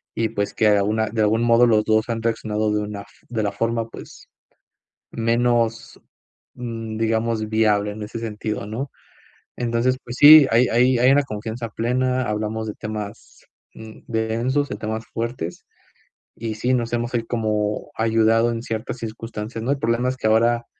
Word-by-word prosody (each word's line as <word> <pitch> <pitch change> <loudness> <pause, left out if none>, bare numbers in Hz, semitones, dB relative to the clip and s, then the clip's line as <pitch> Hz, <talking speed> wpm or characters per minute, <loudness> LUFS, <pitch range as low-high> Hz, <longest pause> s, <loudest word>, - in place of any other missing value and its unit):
y, 115 -1 0
pues, 100 -2 -2
que 110 - +2
alguna 105 +2 +2
de 110 0 -1
algún 110 +2 +2
modo, 120 +1 +5
los 110 -2 +3
2 110 +1 +2
han 115 -1 -2
reaccionado 110 -2 -1
de 105 - 0
una 105 -1 -5
f - - -16 0.2
de 115 -2 -2
la 100 - 0
forma, 115 +2 -1
pues, - - -12 0.8
menos, 115 0 0 0.6
mm, 115 -2 -5
digamos, 110 0 0
viable 105 -2 +2
en 105 +1 -7
ese 110 +2 -6
sentido, 110 -2 -4
¿no? 125 +6 -5 0.6
Entonces, 120 +2 0
pues, 120 - -7
sí, 150 -1 +10
hay 120 +2 +4
hay 125 +2 +3
hay 125 +2 +5
una 145 +1 +4
confianza 115 0 -5
plena, 125 +3 0
hablamos 110 +1 -2
de 105 - -4
temas, 105 0 -7 0.3
mm, 110 -1 -11
densos, 120 +5 -1
de - - -4
temas 110 +1 -4
fuertes. 115 -7 -4 0.7
Y 110 -1 -4
sí, 125 +4 0
nos 120 -2 0
hemos 120 +1 -2
ahí 120 -1 0
como 105 -3 -2
ayudado 115 +1 +3
en 115 -1 -3
ciertas 115 +1 -4
circunstancias, 115 -1 -6
¿no? 130 - 0
El 140 - 0
problema 115 +1 +1
es 130 - -4
que 110 - -1
ahora 115 +2 +3
115 Hz, 170 wpm, -22 LUFS, 110-120 Hz, 0.8 s, sí